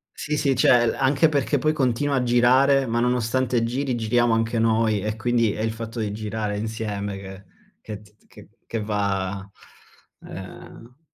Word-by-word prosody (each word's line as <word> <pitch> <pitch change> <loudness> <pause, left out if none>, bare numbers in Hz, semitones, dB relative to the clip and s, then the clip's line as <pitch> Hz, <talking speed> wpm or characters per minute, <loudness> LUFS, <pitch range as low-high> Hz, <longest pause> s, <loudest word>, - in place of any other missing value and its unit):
Sì, 150 0 -3
sì, 140 -2 +1
cioè 120 -1 +4
l - - 0
anche 135 +4 +3
perché 145 0 +1
poi 155 +4 +1
continua 140 0 0
a 125 - +1
girare, 130 +3 +4
ma 115 +1 0
nonostante 125 0 +1
giri, 130 +2 -1
giriamo 120 +1 +2
anche 115 +1 0
noi 110 -2 +2
e 105 +2 -3
quindi 115 -1 +1
è 110 - -4
il 110 0 -1
fatto 115 +1 -7
di 105 -2 -2
girare 105 -1 -3
insieme 105 -2 -4
che 95 0 -10 0.4
che 105 -1 -8
t 105 0 -22
t - - -32
che - - -16 0.2
che 115 - -3
va, 100 -2 -2 0.7
uhm, - - -14
ehm 125 +6 -12
115 Hz, 180 wpm, -23 LUFS, 105-125 Hz, 0.7 s, cioè